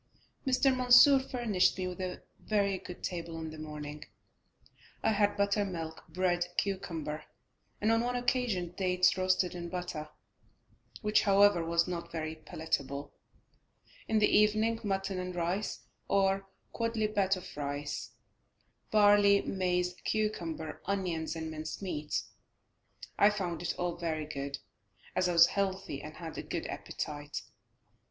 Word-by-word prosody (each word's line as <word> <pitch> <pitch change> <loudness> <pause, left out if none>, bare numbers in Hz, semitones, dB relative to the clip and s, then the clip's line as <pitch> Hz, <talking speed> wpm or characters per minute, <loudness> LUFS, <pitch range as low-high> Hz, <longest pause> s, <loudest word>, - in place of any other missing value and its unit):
Mr. 265 0 +4
Mansur 255 +2 +8
furnished 235 -8 +1
me 185 - -2
with 180 0 -5
a 185 -1 -4 0.2
very 200 -3 +1
good 180 - -10
table 170 -2 -4
in 160 -1 -5
the 155 - -9
morning, 150 -1 -7 1.0
I - - +3
had 205 -1 +2
buttermilk, 195 -6 -1
bread, 175 +1 +1
cucumber, 165 -6 -2 0.5
and 215 +2 +2
on 225 0 +3
one 245 +1 -1
occasion 245 -8 0
dates 180 -1 +3
roasted 185 -1 +1
in 170 -1 -5
butter, 175 -4 -4 0.9
which, 210 0 +4
however, 200 -3 +5
was 170 +1 +2
not 170 -1 -4
very 160 -1 -3
palatable; 145 -3 -3 0.9
in 220 - +2
the 215 - +5
evening 215 +2 +3
mutton 195 -2 -1
and 180 0 -4
rice, 180 +4 -2 0.3
or 195 -1 +4
a 195 0 -9 0.3
quodlibet 215 -4 +1
of 180 - -10
rice, 145 0 -4 0.8
barley, 205 -1 +6
maize, 180 -1 0
cucumber, 170 -8 -2
onions 175 -5 -1
and 160 -1 -4
minced 155 0 -5
meat. 155 -5 -2 1.0
I 205 - +7
found 180 -6 -3
it 175 - -2
all 175 -1 -2
very 160 -3 -2
good 140 -2 -4 0.6
as 185 -1 +2
I - - +1
was 170 0 +9
healthy, 190 -7 -2
and 155 +1 -9
had 165 -2 -7
a - - -2
good - - -4
appetite. 145 -1 -5
180 Hz, 135 wpm, -31 LUFS, 160-205 Hz, 1.0 s, was